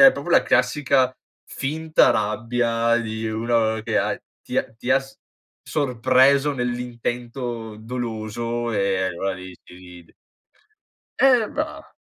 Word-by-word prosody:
è 270 -1 +9
proprio 145 +5 -6
la - - +5
classica 130 0 +2 0.3
finta 155 +3 +1
rabbia 115 +1 +1
di 110 -1 -3
uno 110 0 0
che 110 -3 +1
ha - - 0 0.3
ti - - -5
h 110 - -1
ti 130 - 0
ha 135 - +4
s 135 0 -15 0.4
sorpreso 135 +1 +3
nell'intento 120 -2 -4
doloso 115 0 -4
e 100 -3 0
allora 95 +1 -2
lì 95 0 -9
ci 90 - -15
rid 90 -2 -14 1.1
Eh, 250 -4 +5
va 310 +4 -5
120 Hz, 125 wpm, -23 LUFS, 110-135 Hz, 1.1 s, è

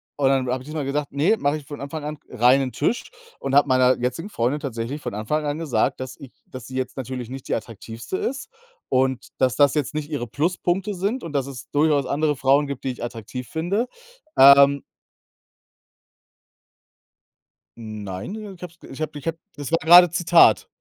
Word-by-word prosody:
und 140 -2 +2
dann 135 -1 +1
habe 125 +1 -2
ich - - -17
diesmal 155 -2 -4
gesagt, 145 +1 -2
ne, 155 +10 +2
mache 145 -3 0
ich 145 - -12
von 145 +1 -8
Anfang 145 +2 -6
an 150 +1 -5
reinen 130 +2 +3
Tisch 240 - -2 0.3
und 135 - -4
habe 145 - +5
meiner 130 0 +4
jetzigen 125 - -3
Freundin 130 - -1
tatsächlich 135 0 -5
von - - -5
Anfang 110 +9 -2
an 145 +1 -2
gesagt, 135 -4 0
dass 130 -1 -6
ich 135 -3 -11 0.2
dass 130 -2 -9
sie 130 - -9
jetzt 130 +1 -3
natürlich 130 -2 -5
nicht 135 0 -8
die - - 0
attraktivste 115 - -6
ist 270 +2 -4 0.4
und 130 0 +1
dass 130 -2 +2
das 145 0 +4
jetzt 150 -3 -1
nicht 150 -1 -4
ihre 140 -6 -3
Pluspunkte 175 - -1
sind 205 +8 -2
und 165 - -7
dass 140 -3 0
es 130 -5 -9
durchaus 145 -1 +2
andere 150 +1 0
Frauen 135 +2 +3
gibt, 140 -2 -6
die 130 - -1
ich 125 - -8
attraktiv 120 +1 -6
finde, 185 +9 -1 0.5
ähm 140 +1 +7 3.0
Nein, 105 - -6
äh, 210 -2 -8
ich 180 - -19
habe 180 -2 -7
es - - -13
ich 135 - -9
habe 155 -1 -4
ich 145 - -13
habe, 165 0 -2 0.2
das 145 -2 -6
war 165 - +3
grade 175 +2 +8
Zitat. 175 0 +5
140 Hz, 195 wpm, -23 LUFS, 130-155 Hz, 3.0 s, grade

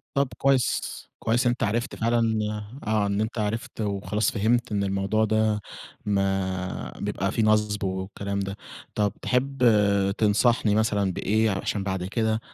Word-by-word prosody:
طَب 140 -1 +2
كويس، 135 -3 +3 0.4
كويس 120 +3 +1
إن - - +5
أنت 120 - -3
عرِفت 115 +4 0
فعلًا 115 -1 +1 0.5
آآ، 110 - -1
آه، 105 -2 +2
إن 100 +1 0
أنت 110 +1 -2
عرِفت 110 +2 -3
وخلاص 100 +1 0
فهِمت 115 +2 +1
إن 100 -1 +1
الموضوع 100 +3 +1
ده 110 -1 +1 0.5
ما 95 -2 -1
بيبقى 95 +1 -1
فيه 115 - +1
نصْب 105 -1 +2
والكلام 95 +1 -3
ده. 100 +1 -4 0.4
طَب 105 -2 +1
تحب 130 +1 0 0.6
تنصحني 110 0 +3
مثلًا 105 -3 +1
بإيه 110 +4 +1
عشان 95 +1 -2
بعد 95 -2 -2
كده 110 +2 0
105 Hz, 150 wpm, -26 LUFS, 100-115 Hz, 0.6 s, إن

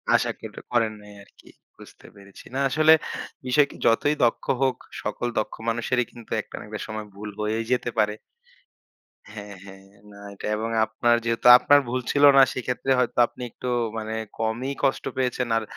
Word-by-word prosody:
আশা - - +1
কেউ - - -8
টা - - -7
করেন 115 -3 +1
নাই 105 0 -14
আরকি - - -23 0.3
বুঝতে - - -16
পেরেছি। 100 -1 -15
না। 135 - -2
আসলে 155 +3 +5 0.5
বিষয়কে 140 +3 +2
যতই 145 +6 +3
দক্ষ 120 - +1 0.2
হোক, 130 -1 +1 0.3
সকল 120 - -3
দক্ষ 110 - -4
মানুষেরই 120 +1 0
কিন্তু 120 -2 -14
একটা - - -12
না - - -9
একটা 105 0 -6
সময় 110 -1 -5
ভুল 105 +1 -7
হয়েই 110 +1 -1
যেতে 125 -1 +1
পারে। 105 -1 +2 1.2
হ্যাঁ, 105 -1 -9
হ্যাঁ, 95 0 -13 0.3
না 100 - -14 0.2
এটা - - -9
এবং 110 +1 -3 0.2
আপনার 120 +2 +1
যেহেতু 115 +1 +1
আপনার 145 +3 +5
ভুল 130 +2 -1
ছিল 145 0 +1
না - - +9
সেক্ষেত্রে 130 +1 -2
হয়তো 125 - -1
আপনি 125 - -14
একটু 125 - -8 0.3
মানে 110 0 -4 0.3
কমই 115 +5 -2
কষ্ট 135 - +1
পেয়েছেন। 125 -1 -1
আর 115 - -1
115 Hz, 175 wpm, -24 LUFS, 110-125 Hz, 1.2 s, না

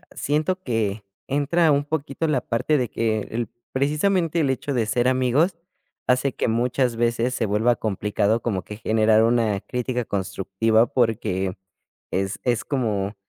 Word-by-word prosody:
siento 155 +6 0
que 110 - -1 0.2
entra 150 +4 +2
un 140 0 +2
poquito 150 0 -2
la 150 -4 +2
parte 125 +6 0
de 125 -3 -1
que 110 -1 0
el 115 -1 -2 0.2
precisamente 165 +5 +1
el 140 - +1
hecho 135 +2 -2
de 120 -4 +1
ser 120 +3 +1
amigos 130 +7 +2 0.5
hace 130 +1 +2
que - - -1
muchas 120 +2 +1
veces 120 +1 +1
se 120 - 0
vuelva 110 +4 +2
complicado 105 +1 0
como 100 -6 -2
que 105 - -8
generar 110 0 +3
una 115 -3 +2
crítica 125 +2 -3
constructiva 100 +3 +1
porque 105 -6 0 0.5
es 95 +1 -1
es 120 -3 +1
como: 105 -7 -1
120 Hz, 150 wpm, -23 LUFS, 110-140 Hz, 0.5 s, generar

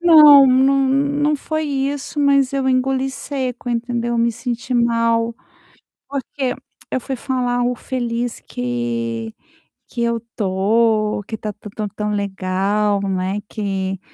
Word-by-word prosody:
Não 300 -5 +9
não 265 +2 +4
não 285 +2 +1
foi 310 +2 -3
isso, 280 +1 -2
mas 275 -2 +3
eu 270 -1 0
engoli 265 +1 +1
seco 260 -3 -4
entendeu, 240 0 -1
me 235 0 +2
senti 240 +2 -4
mal, 230 -1 +2 0.8
porque 270 -1 -3 0.4
eu - - 0
fui 265 +2 -4
falar 245 -1 -1
o 245 0 0
feliz 240 -2 -3
que 115 -2 -3 0.6
que 235 - -4
eu 235 0 +1
estou, 215 0 +1
que 220 - -6
está 215 -1 -5
tão 210 +1 -11
tão 210 +1 -4
tão 210 +1 -3
legal, 200 +1 0
né, 190 +1 -1
que 195 -3 -3
235 Hz, 130 wpm, -20 LUFS, 210-265 Hz, 0.8 s, Não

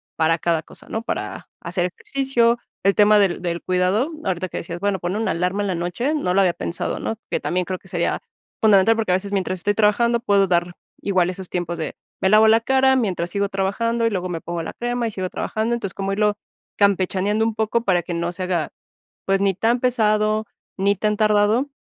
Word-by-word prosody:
para 165 +1 +2
cada 165 -1 0
cosa, - - -14
¿no? 225 - -3
Para - - -5
hacer 175 +1 -1
ejercicio, 240 +4 +1 0.3
el 195 0 +3
tema 210 0 +6
del 190 -3 +1
del 170 -1 -2
cuidado, 185 - +1
ahorita 185 -1 -2
que - - -6
decías, 170 +1 -5
bueno, 200 0 0
pon 175 +2 -3
una 220 +1 0
alarma 180 +4 -1
en 205 - -1
la 185 - -1
noche, 180 - -1
no 180 -12 0
lo 195 - +3
había 180 -3 +3
pensado, 170 - -3
¿no?, 225 - -3
que - - 0
también 180 0 -1
creo 185 +1 -3
que - - -20
sería - - -1 0.4
fundamental, 215 +1 +5
porque 220 -5 -1
a - - +4
veces 200 +2 -4
mientras 185 -2 -1
estoy 205 +3 +1
trabajando 230 +3 +2
puedo 200 -4 +3
dar 175 0 0 0.3
igual 185 -3 +1
esos 185 0 -6
tiempos 175 -1 -3
de, 160 - -4 0.3
me 190 - +3
lavo 215 +2 +6
la 225 +1 +5
cara 265 +1 +3
mientras 185 -8 -1
sigo 200 +2 -1
trabajando, 230 +5 0
y 230 - +3
luego 185 -3 -3
me 170 -2 -3
pongo 170 0 -4
la - - -5
crema, 240 0 -2
y - - -4
sigo 185 -2 -3
trabajando. 220 +5 -2
Entonces, 200 -5 -5
como 195 0 -2
irlo 210 0 +1 0.4
campechaneando 200 +1 +2
un 225 - -1
poco 220 +1 0
para 180 -4 +2
que 175 - -5
no 170 +1 -2
se 185 - -5
haga, 175 -4 -1 0.6
pues, 195 0 +2
ni 195 0 +2
tan 230 +6 +1
pesado, 215 -3 +1 0.3
ni 200 +1 +2
tan 210 +2 0
tardado, 215 +4 +3
200 Hz, 215 wpm, -22 LUFS, 180-220 Hz, 0.6 s, tema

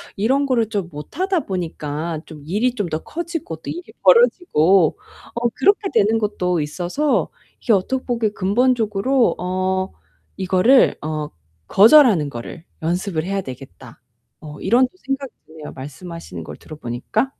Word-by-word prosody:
이런 265 +8 +1
거를 235 -5 +1
좀 200 -6 -3
못하다 335 - -2
보니까 160 - -4
좀 155 -3 -12
일이 225 +9 0
좀 205 -6 -2
더 155 - -2
커지고 330 - -5
또 160 - -9
일이 350 - -4 0.2
벌어지고 195 - +4 0.4
어 235 0 +1
그렇게 400 0 +2
되는 220 +3 +3
것도 180 -5 -1
있어서 175 - -1 0.3
이게 235 - 0
언뜻 255 +7 0
보기에 235 -3 0
근본적으로 230 +3 +1
어 185 +1 -1 0.5
이거를 190 +8 +4
어 155 -1 -3 0.4
'거절하는 215 - +6
거를 140 +7 -8 0.2
연습을 170 0 -1
해야 195 +2 -2
되겠다.' 130 - -11 0.4
어 150 -1 -10
이런 240 +6 +3
또 - - -33
생각이 270 -6 -4 0.2
드네요, 155 -1 -10
말씀하시는 165 +5 -8
걸 - - -9
들어 155 - -11
보니까. 150 - -2
195 Hz, 305 characters per minute, -20 LUFS, 160-250 Hz, 0.5 s, 거절하는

